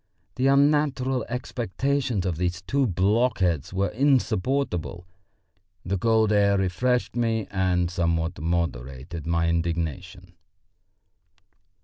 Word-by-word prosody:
The 130 +1 +1
unnatural 140 -3 +2
expectations 125 -1 -2
of 90 -4 -1
these 90 +1 -2
two 140 +5 +1
block 105 +7 +1
heads 85 -5 0
were 95 0 0
insupportable. 125 - 0 0.8
The 95 +2 -1
cold 110 0 +3
air 100 -1 +3
refreshed 120 +8 0
me 115 -3 0
and 90 -2 +1
somewhat 85 -1 -1
moderated 80 -2 -3
my 85 0 +1
indignation. 85 +2 -3
95 Hz, 100 wpm, -25 LUFS, 85-125 Hz, 0.8 s, cold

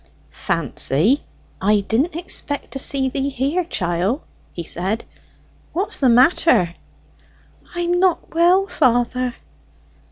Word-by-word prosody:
"Fancy, 165 - 0 0.4
I 205 +2 +3
didn't 260 - 0
expect 325 -4 -1
to 270 - -3
see 270 0 +2
thee 275 +1 -2
here, 280 +7 -1
chiel," 185 - -2 0.3
he 170 - -6
said. 190 +7 -3 0.7
"What's 380 +5 -1
the 265 - +3
matter?" 245 - +4 1.0
"I'm 350 0 0
not 365 -2 +1
well, 350 +4 +4
father." 250 -5 +1
260 Hz, 105 wpm, -20 LUFS, 205-335 Hz, 1.0 s, matter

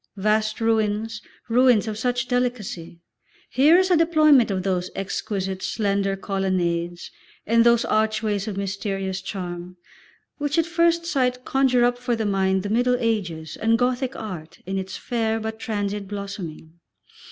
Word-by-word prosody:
Vast 215 +2 +1
ruins, 220 -1 0 0.3
ruins 240 -2 +4
of 215 - -3
such 245 +3 -1
delicacy! 245 -10 -2 0.5
Here 295 +7 +6
is 370 0 +2
a - - +6
deployment 310 -7 +5
of 190 -2 -1
those 185 -2 -1
exquisite, 195 -1 -3
slender 200 -2 0
colonnades 175 -3 -2 0.3
and 230 +1 +4
those 235 0 +4
archways 215 -2 0
of 205 -3 -4
mysterious 195 -1 -3
charm, 180 -2 -6 0.6
which 290 +1 -1
at 330 - +3
first 335 0 +2
sight 255 -5 0
conjure 255 -2 +3
up 245 0 0
for 245 -1 -1
the 225 -1 -2
mind 190 -1 +1
the 205 - -3
Middle 250 +2 +2
Ages 180 -10 -2
and 225 +1 +2
Gothic 250 +2 0
Art 175 -7 -7
in 190 +1 -2
its 190 0 -6
fair 225 -2 -1
but 220 0 -5
transient 205 -4 -3
blossoming. 185 -5 -7
215 Hz, 145 wpm, -23 LUFS, 195-245 Hz, 0.6 s, Here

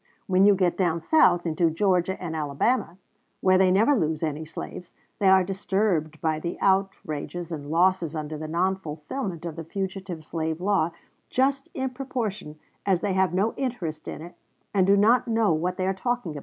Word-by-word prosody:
When 190 +1 +4
you 205 -1 +6
get 180 -2 +1
down 170 -3 +1
South, 175 - +4
into 165 0 +2
Georgia 185 +2 +1
and 165 -3 -4
Alabama, 160 - 0 0.4
where 185 0 +4
they 190 -1 +5
never 215 +10 +4
lose 160 - 0
any 155 0 -2
slaves, 175 +2 -8 0.2
they 200 - +3
are 190 -1 +6
disturbed 190 -5 -1
by 155 -2 0
the 170 +2 -4
outrages 175 -3 -1
and 145 -3 -6
losses 170 -1 +2
under 155 0 -4
the 155 +1 -6
non 185 +4 +1
fulfillment 170 - -5
of 165 -2 -5
the 165 - -5
fugitive 185 -1 -5
slave 160 0 -3
law 190 -3 +2 0.4
just 270 +1 +1
in 265 -1 -2
proportion 235 - -4 0.3
as 185 -3 +1
they 200 -2 0
have 190 0 +2
no 205 +4 +1
interest 185 - -4
in - - -6
it, 175 - -10 0.4
and 190 -2 +3
do 200 +1 +5
not 235 +5 +4
know 225 -5 +2
what 180 +4 -1
they 185 - -1
are 190 - +1
talking 230 -1 -2
about." - - -4
185 Hz, 185 wpm, -25 LUFS, 160-200 Hz, 0.4 s, you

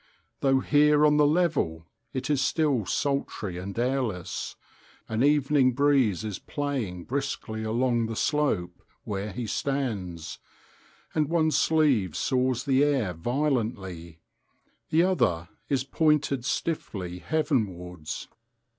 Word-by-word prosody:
Though 135 -1 +3
here 150 +1 +4
on 150 0 +4
the 150 -1 +5
level 145 - +1 0.3
it 130 - -3
is 140 -3 +2
still 140 - +1
sultry 115 -10 -2
and 95 +3 -7
airless, 120 -7 -2 0.5
an 110 +3 0
evening 140 -2 +4
breeze 130 -8 +3
is 105 -3 -4
playing 130 - -3
briskly 125 -3 -3
along 120 +1 +1
the 115 - -4
slope 105 - 0 0.2
where 100 +1 -4
he 120 +5 -4
stands, 105 - -3 0.7
and 150 -2 +1
one 160 -2 +2
sleeve 140 - +2
saws 130 -1 +1
the 135 0 +3
air 135 -11 +1
violently; 100 - -2 0.7
the 165 +2 +4
other 85 - +1 0.2
is 135 -3 +1
pointed 145 -3 +1
stiffly 95 - -3
heavenwards. 95 - -2
130 Hz, 115 wpm, -27 LUFS, 100-145 Hz, 0.7 s, the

